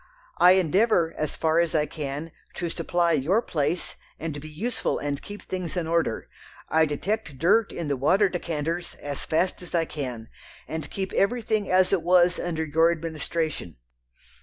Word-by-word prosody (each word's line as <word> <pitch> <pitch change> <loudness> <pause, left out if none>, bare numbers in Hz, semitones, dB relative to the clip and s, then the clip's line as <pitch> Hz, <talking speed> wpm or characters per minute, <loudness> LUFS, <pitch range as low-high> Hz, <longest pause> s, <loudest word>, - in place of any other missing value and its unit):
I 180 +1 +8
endeavour, 185 -1 +3
as 155 -2 -2
far 160 0 +2
as 170 -2 +1
I 150 -1 +3
can, 150 +1 -5 0.2
to 175 -2 -2
supply 170 +1 +1
your 160 +7 +2
place, 165 -5 -2 0.2
and 155 -3 -4
be 155 - -9
useful 220 +11 -2
and 145 -1 -3
keep 205 0 -9
things 185 -1 -4
in 175 - 0
order. 165 -8 0 0.4
I 160 0 +4
detect 155 +1 -3
dirt 200 - +3
in 170 - -4
the 140 - 0
water 185 +10 +3
decanters, 170 -1 -3
as 145 -1 -5
fast 180 +4 0
as 180 - -6
I 165 -1 +2
can, 125 -8 -5 0.4
and 160 -2 -5
keep 190 -1 -4
everything 215 -1 +1
as 185 +1 +4
it 190 - +3
was 175 +1 +4
under 160 -2 -2
your 160 +2 +4
administration.... 160 - -3
165 Hz, 165 wpm, -26 LUFS, 150-185 Hz, 0.4 s, I